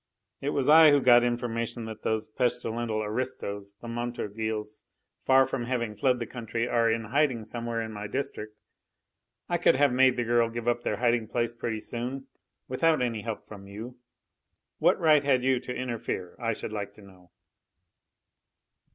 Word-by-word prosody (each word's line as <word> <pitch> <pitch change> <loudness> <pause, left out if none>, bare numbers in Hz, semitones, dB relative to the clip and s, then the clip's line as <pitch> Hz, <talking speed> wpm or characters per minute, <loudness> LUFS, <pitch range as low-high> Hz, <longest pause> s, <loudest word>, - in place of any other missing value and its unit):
It 140 - -1
was 140 -3 0
I 160 +1 +9
who 145 -1 +5
got 120 -2 +6
information 120 -1 -2
that 110 -1 -8
those 110 0 -1
pestilential 115 -2 -1
aristos, 105 -3 -4
the 120 - -8
Montorgueils, 110 -2 -4 0.5
far 135 0 +6
from 130 -2 -3
having 120 -3 -2
fled 125 +4 +2
the 120 - -3
country 115 0 -3
are 115 -1 +2
in 115 0 0
hiding 125 -1 +1
somewhere 115 0 -3
in 110 - -6
my 105 -1 -6
district. 105 -3 -4 0.9
I - - 0
could - - +4
have 140 -1 +3
made 130 0 +4
the 120 - +1
girl 120 0 +2
give 120 0 -6
up 120 0 +1
their - - -2
hiding 120 -2 +1
place 120 +1 -1
pretty 115 -2 -4
soon, 125 +3 -5 0.4
without 155 +4 +2
any 115 -3 -2
help 110 0 -6
from 100 -2 -11
you. 115 +5 -9 0.8
What - - +3
right 155 -3 +5
had 130 -3 +2
you 130 -1 +2
to 125 - -7
interfere, 115 -8 -4
I 115 -2 0
should 110 - -6
like 100 -1 -5
to 105 - -15
know?" 90 -2 -18
120 Hz, 170 wpm, -28 LUFS, 110-125 Hz, 0.9 s, I